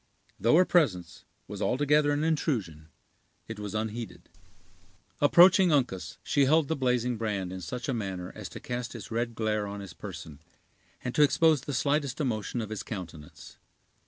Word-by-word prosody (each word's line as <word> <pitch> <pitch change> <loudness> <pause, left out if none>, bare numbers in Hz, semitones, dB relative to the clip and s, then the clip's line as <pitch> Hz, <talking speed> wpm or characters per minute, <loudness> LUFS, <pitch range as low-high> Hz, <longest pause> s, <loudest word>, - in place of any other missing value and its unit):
Though 115 +5 +4
her 180 +2 +6
presence 95 - 0 0.2
was - - -7
altogether 145 +3 +2
an 145 +1 0
intrusion, 115 - -1 0.6
it 115 -2 -7
was 105 0 -5
unheeded. 110 -3 -5 0.9
Approaching 180 +4 +6
Uncas, 125 -11 0
she 140 - +2
held 155 +1 +3
the 160 - +1
blazing 125 -3 0
brand 100 -5 -3
in 95 - -6
such 120 +9 -5
a 135 - 0
manner 95 -5 -4
as - - -8
to - - -9
cast 120 0 -5
its 115 - -9
red 115 0 -2
glare 110 -2 -1
on 100 0 -6
his 100 -3 -9
person, 80 -7 -9 0.6
and 125 - -3
to - - +2
expose 150 +1 +4
the 145 0 -5
slightest 140 +1 0
emotion 120 -4 -2
of 110 -1 -6
his 110 - -4
countenance. 85 -7 -9
120 Hz, 165 wpm, -28 LUFS, 100-145 Hz, 0.9 s, her